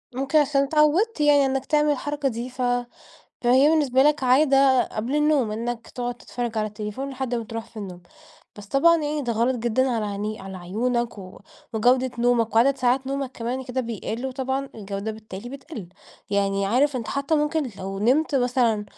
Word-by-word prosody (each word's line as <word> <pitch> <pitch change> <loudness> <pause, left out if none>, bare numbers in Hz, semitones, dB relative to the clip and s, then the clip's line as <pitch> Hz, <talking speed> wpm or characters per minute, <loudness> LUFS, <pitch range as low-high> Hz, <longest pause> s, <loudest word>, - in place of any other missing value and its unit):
ممكن 270 +3 +1
عشان 280 -1 +2
اتعودت 305 +8 +2
يعني 290 -1 +5
إنك 265 0 -1
تعمل 300 -1 +2
الحركة 290 0 -1
دي 235 +1 -5
ف 255 0 -8 0.8
فهي 255 +4 +5
بالنسبة 280 -5 +3
لك 300 0 +3
عادة 270 0 +5
قبل 230 +6 -4
النوم 295 -6 +2
إنك 230 +1 -4
تقعد 245 -1 -4
تتفرج 240 -2 -5
على 215 - 0
التليفون 210 +6 -5
لحد 260 -2 -3
ما 230 -1 -2
تروح 225 +1 -6
في 230 - -23
النوم. 185 -4 -7 0.5
بس 205 -1 -10
طبعًا 310 +9 +4
يعني 300 -1 -2
ده 240 -3 -1
غلط 235 +3 +1
جدًا 240 +3 +1
على 225 -3 -1
عيني 210 +1 -4
على 190 0 -8
عيونك 235 +6 -2
و 185 -1 -11 0.3
وجودة 250 +3 +3
نومك، 235 -2 +1
وعدد 265 +4 +4
ساعات 255 +1 +1
نومك 275 -1 -3
كمان 245 +3 -4
كده 255 +1 -2
بيقل 230 +1 -4
وطبعًا 265 +1 -3
الجودة 200 0 -5
بالتالي 215 0 -9
بتقل، 270 - -9 0.4
يعني 200 -1 +1
عارف 260 +6 +2
أنت 235 -3 -5
حتى 280 +3 -1
ممكن 300 -2 0
لو 195 +1 -5
نمت 265 +9 +2
مثلًا 245 -4 +2
250 Hz, 175 wpm, -24 LUFS, 220-275 Hz, 0.8 s, يعني